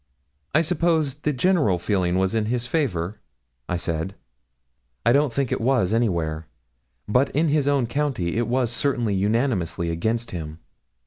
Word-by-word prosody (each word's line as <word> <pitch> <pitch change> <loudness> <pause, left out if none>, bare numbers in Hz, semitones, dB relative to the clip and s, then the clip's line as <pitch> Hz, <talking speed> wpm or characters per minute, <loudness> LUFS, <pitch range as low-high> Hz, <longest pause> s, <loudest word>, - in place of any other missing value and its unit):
'I 155 - +6
suppose 165 -4 +1
the 150 +1 -2
general 145 - +2
feeling 90 -1 0
was 95 +1 +1
in 110 -1 +1
his 120 +1 -1
favour?' 105 - -1 0.5
I 90 - 0
said. 85 +3 -3 0.9
'I 115 - +5
don't 140 -1 +3
think 135 +1 -1
it - - -1
was, 115 -5 +2
anywhere; 85 -9 0 0.6
but 125 +6 +3
in 155 +2 +3
his 145 -1 +2
own 140 -3 +2
county 120 -9 -1
it 120 - 0
was 125 -1 +1
certainly 120 -4 0
unanimously 100 - 0
against 110 +8 -1
him. 80 -3 -6
115 Hz, 150 wpm, -24 LUFS, 90-140 Hz, 0.9 s, I